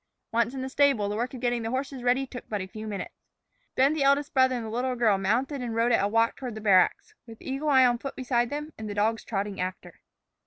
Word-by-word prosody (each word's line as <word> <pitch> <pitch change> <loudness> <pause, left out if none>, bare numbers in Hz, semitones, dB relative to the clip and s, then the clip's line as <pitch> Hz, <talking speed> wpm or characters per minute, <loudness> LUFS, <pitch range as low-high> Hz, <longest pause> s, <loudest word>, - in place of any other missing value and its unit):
Once 235 +2 +1
in 260 - -4
the - - -3
stable, 270 -6 +2
the 205 - -3
work 240 +3 -2
of - - -7
getting 240 -1 0
the 225 - -3
horses 265 +1 -3
ready 250 +2 +2
took 255 -1 -10
but 210 - -2
a 190 - -4
few 215 +3 -8
moments. 200 -3 -5 0.6
Then 275 +3 +4
the 310 - -2
eldest 280 +1 +2
brother 260 -1 +4
and 235 -2 -4
the - - -5
little 250 +2 -1
girl 220 -5 +2
mounted 250 +8 0
and 235 -2 -4
rode 230 +1 +2
at 230 - +3
a - - +2
walk 225 +2 +1
toward 250 -4 -6
the - - -6
barracks, 195 -4 +3
with 225 -1 -12
Eagle 275 +3 -3
Eye 260 -2 +6
on 240 -1 +2
foot 275 +2 -6
beside 245 -2 0
them 300 +2 -5
and 215 -1 -5
the 205 - -5
dogs 220 +2 0
trotting 200 -2 -3
after. 185 0 -6
240 Hz, 260 wpm, -27 LUFS, 215-265 Hz, 0.6 s, Eye